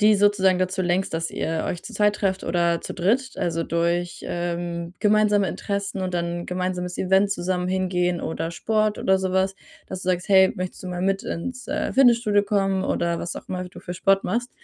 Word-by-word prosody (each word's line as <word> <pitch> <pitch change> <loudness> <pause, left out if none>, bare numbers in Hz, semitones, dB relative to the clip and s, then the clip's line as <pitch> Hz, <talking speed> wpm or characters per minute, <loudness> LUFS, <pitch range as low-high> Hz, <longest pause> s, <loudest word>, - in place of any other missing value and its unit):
die 210 +1 +6
sozusagen 195 -2 +3
dazu 185 +1 -1
lenkst, 180 +2 0
dass 165 0 -2
ihr 160 0 -2
euch 175 - -4
zu 235 - -8
zweit 210 0 +3
trefft 190 -1 -1
oder 170 -1 +1
zu - - -7
dritt. 235 +9 +1
Also, 165 -1 -1
durch, 170 +1 -1
ähm, 175 0 -3
gemeinsame 210 -1 +3
Interessen 200 -1 -3
und 185 -1 -3
dann 175 0 -2
gemeinsames 180 0 -3
Event 190 +2 +3
zusammen 180 -1 -1
hingehen 180 -2 0
oder 165 +1 -3
Sport 215 +4 0
oder 190 0 +3
so 190 0 -1
was, 190 +1 +1 0.3
dass 185 - -6
du - - -4
sagst: 180 -1 0
„Hey, 190 -1 +6
möchtest 185 +2 -5
du - - -7
mal 180 0 -3
mit 195 +1 +1
ins, 255 +9 -5
äh, 305 +2 -1
Fitnessstudio 235 -6 +4
kommen?" 195 -2 +1
Oder 170 0 0
was 175 - -5
auch - - -9
immer 185 -1 -3
du - - -13
für 175 - -6
Sport 195 +2 +2
machst 240 +6 -1
185 Hz, 200 wpm, -24 LUFS, 175-200 Hz, 0.3 s, die